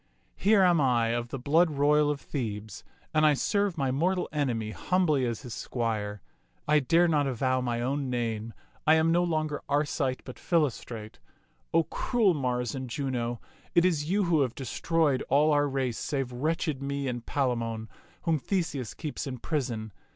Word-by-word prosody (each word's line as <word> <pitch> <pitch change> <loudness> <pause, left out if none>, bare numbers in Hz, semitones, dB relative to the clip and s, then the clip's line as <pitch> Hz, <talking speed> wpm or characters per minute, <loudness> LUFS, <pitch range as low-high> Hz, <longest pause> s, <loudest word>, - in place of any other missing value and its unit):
Here 200 0 +4
am 175 -4 +4
I 120 -4 +3
of 120 +1 -1
the 135 - -5
blood 160 +7 +3
royal 150 0 +3
of 145 -1 -1
Thebes, 110 - -5 0.3
and 155 - +3
I 150 -1 +5
serve 200 +4 0
my 135 -3 0
mortal 180 +7 +1
enemy 120 -8 -1
humbly 155 -3 +1
as 115 -2 -3
his 120 -3 -7
squire. 105 -6 -3 0.4
I 150 0 +5
dare 165 +6 +3
not 150 -4 +2
avow 130 0 0
my 120 -1 -1
own 135 +2 -1
name. 115 -2 -2 0.3
I 155 - +7
am 160 +1 +3
no 175 +1 +3
longer 155 -3 -1
Arcite, 140 -3 0
but 130 - -10
Philostrate. 125 -9 -1 0.5
O 165 - +4
cruel 215 - +1
Mars 125 -4 -1
and 130 -2 -5
Juno, 120 -3 -2 0.4
it 170 - +5
is 160 -4 +1
you 200 +2 +2
who 170 -4 +3
have 125 -3 0
destroyed 145 +2 0
all 150 +3 +4
our 145 -1 +3
race 130 -4 -1
save 135 -3 -2
wretched 150 +2 -1
me 140 0 -2
and 120 -2 -3
Palamon, 115 -5 -1 0.4
whom 160 -3 +1
Theseus 145 - -2
keeps 150 -2 -5
in 130 -1 -4
prison. 120 -6 -3
140 Hz, 170 wpm, -28 LUFS, 120-155 Hz, 0.5 s, I